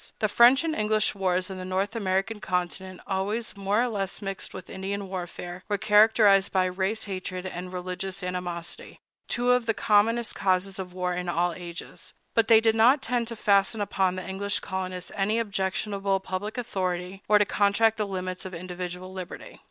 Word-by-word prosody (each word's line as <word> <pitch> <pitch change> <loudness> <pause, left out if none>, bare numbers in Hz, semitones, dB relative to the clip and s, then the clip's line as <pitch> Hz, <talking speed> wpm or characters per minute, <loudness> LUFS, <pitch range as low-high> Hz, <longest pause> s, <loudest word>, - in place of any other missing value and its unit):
The 215 - +1
French 240 +7 +6
and 325 -1 0
English 215 -3 +1
wars 185 -1 0
on 190 - -6
the - - -5
North 190 +4 -1
American 195 +1 0
continent, 185 0 -3
always 205 +5 -2
more 200 +3 +1
or - - +1
less 200 -4 -3
mixed 195 -2 -5
with 185 - -9
Indian 195 +1 -4
warfare, 180 -1 -6
were 205 - +1
characterized 210 -2 +5
by 185 -1 +3
race 190 +4 -1
hatred 185 -2 -5
and 180 0 -6
religious 185 +1 -4
animosity—two 180 +7 -3
of 250 -2 +2
the 225 - +2
commonest 220 +2 +2
causes 190 +1 0
of 185 -1 -5
war 180 0 -2
in 180 0 -3
all 175 0 +1
ages; 175 -1 -8 0.2
but 225 -1 +3
they 225 -2 +8
did 225 0 +3
not 250 +5 +5
tend 240 -1 0
to 230 - -5
fasten 200 0 +3
upon 190 -2 +1
the 185 - -6
English 200 +1 -2
colonists 185 -1 -5
any 210 +2 +1
objectionable 195 -2 -1
public 190 +4 -4
authority, 185 -5 -3
or 210 - +6
to 210 - +4
contract 210 +3 +3
the 210 -1 -1
limits 185 -1 -4
of 185 -1 -7
individual 180 +1 -6
liberty. 185 -2 -8
195 Hz, 175 wpm, -27 LUFS, 185-215 Hz, 0.2 s, they